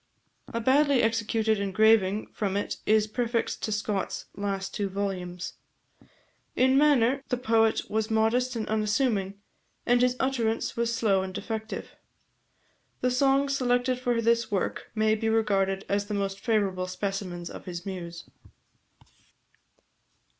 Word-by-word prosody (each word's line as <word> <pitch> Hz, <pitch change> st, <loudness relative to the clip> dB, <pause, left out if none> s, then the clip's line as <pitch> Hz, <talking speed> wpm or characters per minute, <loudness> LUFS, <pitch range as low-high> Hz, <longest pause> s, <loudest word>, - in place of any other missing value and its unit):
A 230 Hz, -, -2 dB
badly 275 Hz, +2 st, +3 dB
executed 225 Hz, -1 st, +1 dB
engraving 205 Hz, 0 st, +3 dB
from 200 Hz, -2 st, -1 dB
it 205 Hz, -, -3 dB
is 215 Hz, 0 st, +4 dB
prefixed 230 Hz, +1 st, -2 dB
to 215 Hz, -, -2 dB
Scott's 210 Hz, -2 st, -2 dB
last 195 Hz, -1 st, -3 dB
two 200 Hz, -2 st, -2 dB
volumes. 180 Hz, -3 st, -4 dB, 1.0 s
In 260 Hz, +1 st, +4 dB
manner, 275 Hz, -2 st, +4 dB
the 250 Hz, -, 0 dB
poet 225 Hz, -2 st, +2 dB
was 220 Hz, +1 st, -1 dB
modest 230 Hz, +3 st, +1 dB
and 220 Hz, -2 st, -3 dB
unassuming, 210 Hz, -2 st, 0 dB, 0.5 s
and 245 Hz, 0 st, +3 dB
his 250 Hz, 0 st, +3 dB
utterance 235 Hz, -4 st, 0 dB
was 235 Hz, 0 st, 0 dB
slow 205 Hz, -5 st, +2 dB
and 190 Hz, -1 st, -6 dB
defective. 220 Hz, +1 st, -5 dB, 1.1 s
The 250 Hz, -, +2 dB
songs 275 Hz, +2 st, +2 dB
selected 245 Hz, -1 st, +1 dB
for 245 Hz, -2 st, 0 dB
this 230 Hz, 0 st, +2 dB
work 195 Hz, -3 st, -2 dB
may 215 Hz, 0 st, +3 dB
be 220 Hz, +1 st, 0 dB
regarded 195 Hz, -3 st, +1 dB
as 200 Hz, 0 st, 0 dB
the 210 Hz, -, -3 dB
most 195 Hz, -1 st, -2 dB
favourable 195 Hz, -5 st, 0 dB
specimens 185 Hz, -2 st, -4 dB
of -, -, -10 dB
his 175 Hz, 0 st, -6 dB
muse. 175 Hz, -3 st, -7 dB
220 Hz, 130 wpm, -27 LUFS, 195-240 Hz, 1.1 s, is